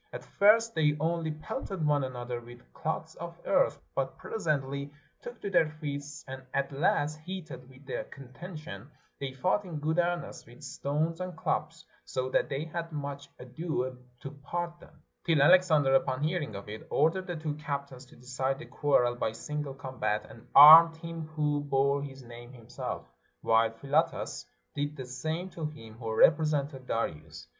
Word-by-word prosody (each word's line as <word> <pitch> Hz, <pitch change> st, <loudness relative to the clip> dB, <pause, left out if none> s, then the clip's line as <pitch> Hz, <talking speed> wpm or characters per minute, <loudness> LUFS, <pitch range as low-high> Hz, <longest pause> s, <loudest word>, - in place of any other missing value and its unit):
At -, -, -8 dB
first 225 Hz, +3 st, +4 dB
they 150 Hz, -2 st, +2 dB
only 165 Hz, +1 st, 0 dB
pelted 170 Hz, +2 st, -4 dB
one 145 Hz, -2 st, +3 dB
another 125 Hz, -2 st, -4 dB
with 120 Hz, +1 st, -15 dB
clods 160 Hz, 0 st, -3 dB
of 170 Hz, 0 st, -8 dB
earth, -, -, +2 dB
but -, -, -2 dB
presently 140 Hz, -8 st, -2 dB, 0.3 s
took 485 Hz, 0 st, -9 dB
to 200 Hz, -, -4 dB
their 165 Hz, -4 st, +4 dB
fists 145 Hz, -1 st, -5 dB
and 130 Hz, 0 st, -7 dB
at 140 Hz, 0 st, 0 dB
last, 150 Hz, 0 st, +1 dB
heated 155 Hz, -6 st, -8 dB
with 130 Hz, +2 st, -17 dB
the 135 Hz, -, -4 dB
contention, 140 Hz, -, -9 dB, 0.3 s
they 140 Hz, -1 st, -3 dB
fought 185 Hz, +10 st, +1 dB
in 175 Hz, -5 st, -6 dB
good 155 Hz, +3 st, 0 dB
earnest 175 Hz, -6 st, -2 dB
with 120 Hz, +5 st, -15 dB
stones 150 Hz, +5 st, -2 dB
and 185 Hz, -1 st, -5 dB
clubs, -, -, -2 dB, 0.2 s
so 130 Hz, 0 st, -3 dB
that -, -, +2 dB
they 140 Hz, +3 st, -2 dB
had 165 Hz, +1 st, -5 dB
much 140 Hz, -1 st, -5 dB
ado 130 Hz, -1 st, -3 dB, 0.3 s
to 135 Hz, -, -6 dB
part 170 Hz, +4 st, -5 dB
them; -, -, -18 dB, 0.2 s
till 165 Hz, -4 st, +3 dB
Alexander, 155 Hz, -3 st, +5 dB
upon 130 Hz, +1 st, +2 dB
hearing 155 Hz, -, -1 dB
of 100 Hz, -, -8 dB
it, 105 Hz, +1 st, -8 dB
ordered 170 Hz, +6 st, +2 dB
the 175 Hz, -, -3 dB
two 155 Hz, -2 st, -3 dB
captains 140 Hz, -3 st, -5 dB
to -, -, -17 dB
decide 130 Hz, +2 st, -2 dB
the -, -, -9 dB
quarrel 125 Hz, -5 st, +2 dB
by 115 Hz, -, -1 dB
single 145 Hz, +4 st, -5 dB
combat, 130 Hz, -6 st, -2 dB
and 115 Hz, +2 st, -14 dB
armed 160 Hz, +3 st, +11 dB
him 165 Hz, -1 st, -6 dB
who 150 Hz, -2 st, 0 dB
bore 140 Hz, 0 st, +2 dB
his 135 Hz, -2 st, -8 dB
name 120 Hz, 0 st, -11 dB
himself, 120 Hz, -, -6 dB, 0.3 s
while 115 Hz, 0 st, +4 dB
Philotas 135 Hz, -, -1 dB, 0.3 s
did 145 Hz, +1 st, -2 dB
the 130 Hz, -, -5 dB
same 155 Hz, +8 st, -3 dB
to 160 Hz, -3 st, -3 dB
him 130 Hz, -8 st, -11 dB
who 115 Hz, -2 st, -4 dB
represented 145 Hz, -4 st, +3 dB
Darius. 80 Hz, -6 st, -3 dB
145 Hz, 165 wpm, -30 LUFS, 130-160 Hz, 0.3 s, armed